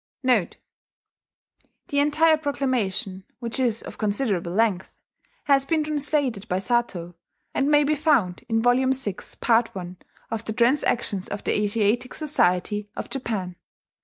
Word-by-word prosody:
"* - - -76
[*The 245 -8 +2 1.3
entire 300 +3 +4
proclamation, 250 -10 -2
which 235 +1 -2
is 235 -4 +1
of - - -10
considerable 205 -5 -1
length, 200 -2 +1 0.5
has 275 -2 +4
been 315 +2 0
translated 290 -7 -1
by 180 - 0
Satow, 195 -5 -1 0.4
and 275 - +1
may 295 0 +5
be 295 +2 +2
found 280 - +1
in 225 0 +1
Vol. 245 +2 +4
VI, 235 -8 -2 0.3
part 230 0 +3
I, 180 -1 -7 0.3
of 225 -1 -2
the 220 - -3
Transactions 235 -5 +1
of 205 - -5
the - - 0
Asiatic 215 +4 0
Society 210 - +1
of - - -6
Japan. 205 -9 -4
235 Hz, 135 wpm, -24 LUFS, 200-275 Hz, 1.3 s, may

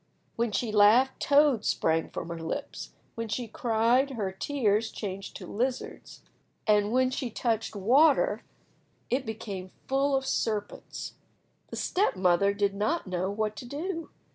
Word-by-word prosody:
When 235 -1 0
she 225 +1 -1
laughed 220 +6 +5
toads 285 -6 +4
sprang 160 0 +1
from 170 - -6
her 170 -1 -5
lips, 160 - -5 0.2
when 230 0 -4
she 230 +3 -3
cried 235 +4 +2
her 215 -8 -3
tears 220 0 0
changed 195 -2 -6
to - - -7
lizards, 250 +4 -4 0.4
and 210 -1 +3
when 255 +1 +3
she 260 -1 -3
touched 225 -1 -1
water 280 - +4 0.7
it 255 0 0
became 200 -4 -5 0.2
full 275 +1 +2
of 270 0 0
serpents. 210 -5 -3 0.5
The - - -8
step 395 - +1
mother 185 +1 +3
did 200 -1 0
not 215 +12 -1
know 185 0 -2
what 215 +1 -2
to 245 - -7
do. 330 +5 -4
225 Hz, 145 wpm, -28 LUFS, 200-265 Hz, 0.7 s, laughed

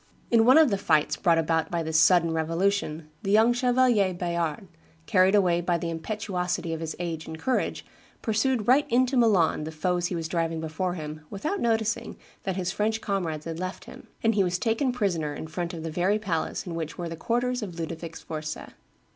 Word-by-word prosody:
In 225 -1 +5
one 255 +5 +7
of 315 -6 +6
the 200 - 0
fights 155 -6 +2
brought 170 -3 +3
about 160 0 +1
by 170 -1 -1
this 160 0 +2
sudden 170 +1 +5
revolution 165 -1 -1
the 195 - -4
young 220 +4 +5
Chevalier 245 -6 +3
Bayard, 170 -1 -2 0.4
carried 190 -1 +4
away 175 -4 +3
by 175 0 +1
the 170 0 -3
impetuosity 180 -1 -3
of 160 - -4
his 160 -1 -4
age 165 -2 -4
and 160 - -6
courage, 255 +10 -1 0.4
pursued 220 +1 +1
right 280 +4 +5
into 255 +2 +2
Milan 205 -11 +3
the 155 - -5
foes 175 +2 0
he 180 - -3
was 165 -1 -3
driving 165 -1 -1
before 160 +3 -2
him, 155 -1 -6
without 310 - -3
noticing 225 0 0 0.3
that 190 -2 -1
his 180 -1 -1
French 215 +3 0
comrades 170 -8 -2
had 165 0 -5
left 185 +1 -5
him; - - -12 0.2
and 225 0 +3
he 200 -2 +3
was 180 -1 0
taken 230 +6 +1
prisoner 175 -11 -1
in - - -6
front 170 +2 -4
of 165 -3 -7
the 165 - -4
very 180 +6 +1
palace 175 -7 -2
in 175 - -5
which 160 -2 -5
were 175 - -4
the 165 - -5
quarters 245 +6 -1
of 180 -5 -6
Ludovic 165 0 -5
Sforza. 155 -1 -6
180 Hz, 200 wpm, -26 LUFS, 165-215 Hz, 0.4 s, one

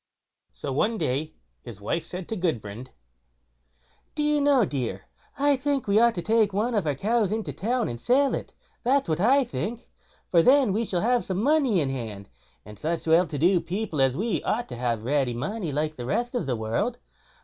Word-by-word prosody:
So 140 - -5
one 220 - +1
day 145 -1 -2 0.3
his 110 -4 -10
wife 135 +11 -2
said 180 -1 -6
to 225 - -2
Gudbrand: 120 - -3 1.3
"Do 300 - -1
you 295 0 +2
know, 280 -5 +4
dear, 120 - -3 0.3
I 285 0 +3
think 275 0 -1
we 205 +1 +3
ought 235 0 +4
to 175 - -3
take 220 -2 +2
one 220 +5 0
of 205 -7 0
our 145 - +1
cows 215 - +1
into 220 0 -2
town, 240 +3 -1
and 120 0 -6
sell 270 +2 +3
it; - - -5 0.3
that's 270 +3 +2
what 155 -1 0
I 265 +8 +4
think; 240 -1 -5 0.4
for 170 - +4
then 260 0 +4
we 225 +3 0
shall 180 -4 -1
have 245 +2 +2
some 190 +2 -2
money 275 - +3
in 135 -2 -1
hand, 110 -6 -6 0.4
and 105 -1 -12
such 165 +2 -2
well 165 +2 +4
to 150 - -5
do 175 +4 +3
people 170 -3 -2
as 135 -1 +2
we 205 -4 -1
ought 240 +3 -1
to - - -6
have 120 -2 -2
ready 130 -1 0
money 170 - -3
like 155 +2 -2
the 120 -1 -5
rest 240 - -1
of 245 - -2
the 125 - 0
world. 115 - -1
190 Hz, 205 wpm, -26 LUFS, -, 1.3 s, know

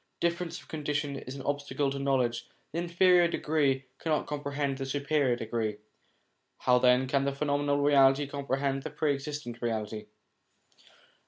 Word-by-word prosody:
Difference 170 0 -1
of - - -17
condition 150 -2 -2
is 130 0 -7
an 135 - -7
obstacle 145 0 -1
to 140 - -4
knowledge; 130 -4 0 0.2
the 165 - -2
inferior 175 +1 +4
degree 145 -5 0
cannot 155 -2 0
comprehend 140 -2 -3
the 135 - -2
superior 140 -2 +1
degree. 110 -2 -2 0.8
How 125 -1 +3
then 125 +1 +4
can 135 +1 +1
the 140 0 0
phenomenal 145 0 +1
reality 140 -1 +5
comprehend 140 -1 -2
the - - -5
Pre 150 -2 0
existent 140 -4 -6
Reality 110 -2 -3
140 Hz, 145 wpm, -29 LUFS, 130-150 Hz, 0.8 s, reality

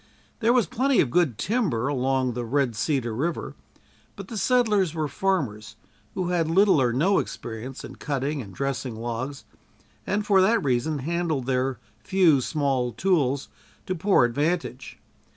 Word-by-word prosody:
There 235 -1 +3
was 245 -4 +3
plenty 265 +1 +1
of 125 - +2
good 155 -10 +2
timber 150 - 0
along 130 -2 0
the 120 +1 -3
Red 125 0 0
Cedar 125 -1 -1
river, 160 +9 -2 0.6
but 200 -2 -9
the 230 - -6
settlers 210 -10 +2
were 155 -2 -1
farmers 130 - -2 0.4
who 185 -2 -1
had 170 -3 +1
little 190 -3 +4
or 125 -2 +2
no 165 +11 +2
experience 120 +3 -6
in - - -10
cutting 140 0 -2
and 100 -5 -10
dressing 135 +1 -3
logs 120 +4 -5 0.6
and 205 +1 0
for 195 -2 +4
that 220 +5 +3
reason 135 +3 0
handled 165 -5 -1
their 130 -1 0 0.2
few 180 -8 +3
small 135 -4 0
tools 140 - +1 0.4
to 185 - -2
poor 185 -6 +3
advantage. 145 +1 -2
145 Hz, 150 wpm, -25 LUFS, 125-185 Hz, 0.6 s, little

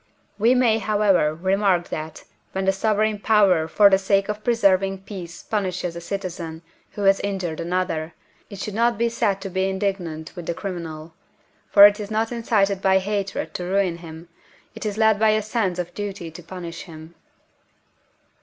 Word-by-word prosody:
we 235 +5 +4
may, 235 -3 +3
however, 205 -7 +2
remark 190 0 +1
that, 155 +1 -6 0.3
when 190 0 -2
the 195 - +4
sovereign 215 +1 0
power 200 -7 +3
for 205 +5 +5
the 190 -1 +4
sake 195 +1 +1
of 210 0 -4
preserving 195 -5 +2
peace 185 -3 -9
punishes 185 -5 -2
a 170 - -6
citizen 170 -3 -5 0.3
who 205 - -4
has 195 0 +4
injured 190 -5 -3
another, 170 -2 -2 0.3
it 200 - -9
should 210 - -4
not 235 +1 +2
be 235 +2 +2
said 205 -4 0
to 195 - -6
be 190 0 -1
indignant 190 -5 -3
with 175 -3 -8
the 170 - -2
criminal, 165 -4 -6 0.6
for 200 0 +9
it 205 +1 +5
is 205 -1 -5
not 220 +1 -1
incited 205 -5 +1
by 190 -1 +4
hatred 200 0 -3
to 180 - -4
ruin 185 -1 0
him, 165 0 -10 0.5
it - - -5
is 210 0 -4
led 220 -2 +3
by 220 0 +4
a 215 0 +2
sense 210 -4 -1
of 175 -1 -4
duty 195 -5 -5
to 165 - -11
punish 170 0 -8
him. 160 -1 -12
195 Hz, 175 wpm, -23 LUFS, 175-210 Hz, 0.6 s, for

